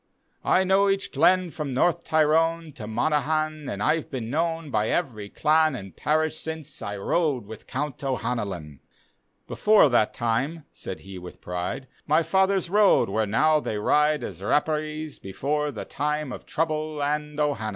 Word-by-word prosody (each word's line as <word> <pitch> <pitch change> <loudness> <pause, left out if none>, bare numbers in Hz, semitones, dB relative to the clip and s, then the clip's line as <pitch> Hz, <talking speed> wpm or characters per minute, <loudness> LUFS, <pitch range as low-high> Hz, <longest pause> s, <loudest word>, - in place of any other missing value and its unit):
I 190 - +3
know 195 +1 +3
each 195 0 0
glenn 180 +4 +3
from 145 -5 -4
North 170 +5 +2
Tyrone 160 +1 +2
To 110 -5 -8
Monaghan, 155 +5 0
and 100 +1 -3
I've 155 +3 +1
been 120 -4 -4
known 165 0 -1
By 110 -1 +1
every 110 -12 -2
dan 155 +4 +3
dnd 95 -7 -8
parish, 155 +1 0
since 160 -3 -6
I 100 0 -4
rode 140 - 0
with 110 +1 -11
Count 140 +1 -4
O'Hanlon." 100 - -3 0.3
" - - -46
Before 210 -8 +5
that 115 -4 +3
time," 135 +8 -1
said 95 - -8
he 95 -1 -9
with 90 0 -10
pride, 90 +9 -4
" - - -34
My 155 +3 +4
fathers 190 +1 +2
rode 205 - +4
where 110 +2 0
now 150 +9 +3
they 110 - -3
ride 150 +6 +2
As 95 -5 -7
R^perees, 155 +5 -1
before 145 +10 -2
the 120 -7 -6
time 150 -1 -2
Of - - -8
Trouble 155 -2 -1
and 150 +1 -2
O'Hanlon." 140 -8 0
150 Hz, 165 wpm, -25 LUFS, 115-160 Hz, 0.3 s, Before